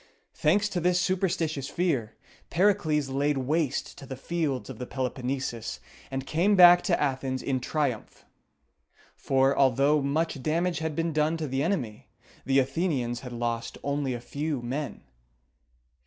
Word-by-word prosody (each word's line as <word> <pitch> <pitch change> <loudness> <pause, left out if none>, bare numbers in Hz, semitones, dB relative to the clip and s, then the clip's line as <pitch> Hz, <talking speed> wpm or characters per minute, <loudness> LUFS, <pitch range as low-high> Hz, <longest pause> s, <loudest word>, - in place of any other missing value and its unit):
Thanks 200 +7 +2
to 185 - -2
this 180 +1 +2
superstitious 170 -6 0
fear, 140 -12 -1 0.3
Pericles 170 -6 +2
laid 140 +2 0
waste 145 +2 -1
the 130 - -4
fields 145 -1 -2
of 130 -4 -9
the 125 - -5
Peloponnesus, 130 -2 -3 0.3
and 135 0 -4
came 180 +8 +2
back 175 -1 +9
to 175 -4 +2
Athens 130 -2 -1
in 130 -2 0
triumph; 130 -3 -3 0.9
for, 135 0 +2
although 140 +3 +3
much 140 +1 -1
damage 165 +3 0
had 160 -1 -3
been 165 0 -1
done 155 +2 +1
to 155 -2 -3
the 135 0 -1
enemy, 135 - -2 0.4
the 135 0 +3
Athenians 135 -3 0
had 125 -1 -8
lost 120 -1 -3
only 140 -2 -1
a - - -5
few 140 +2 -3
men. 135 +5 -4
140 Hz, 140 wpm, -27 LUFS, 130-165 Hz, 0.9 s, back